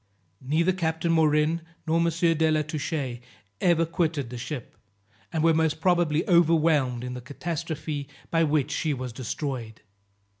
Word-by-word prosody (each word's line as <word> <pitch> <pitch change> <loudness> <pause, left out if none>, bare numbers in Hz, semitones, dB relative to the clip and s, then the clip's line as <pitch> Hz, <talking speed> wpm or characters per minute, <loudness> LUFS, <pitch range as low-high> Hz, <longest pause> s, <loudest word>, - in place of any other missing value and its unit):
Neither 155 +7 +2
Captain 165 -1 -1
Morin, 155 0 +3 0.2
nor 165 +1 +2
M. 170 - +3
de 165 -1 +2
la 155 -1 +2
Touche 145 -4 -3 0.4
ever 170 -2 +4
quitted 160 -6 -1
the 125 - -5
ship, 130 0 -6 0.6
and 160 -2 0
were 165 0 +5
most 160 -1 +1
probably 170 -3 +2
overwhelmed 160 -7 +3
in 125 0 -4
the 125 - -6
catastrophe 150 +1 -4 0.2
by 165 0 +3
which 150 -2 +1
she 150 0 0
was 125 -2 -5
destroyed. 125 -2 -5
155 Hz, 145 wpm, -26 LUFS, 140-165 Hz, 0.6 s, were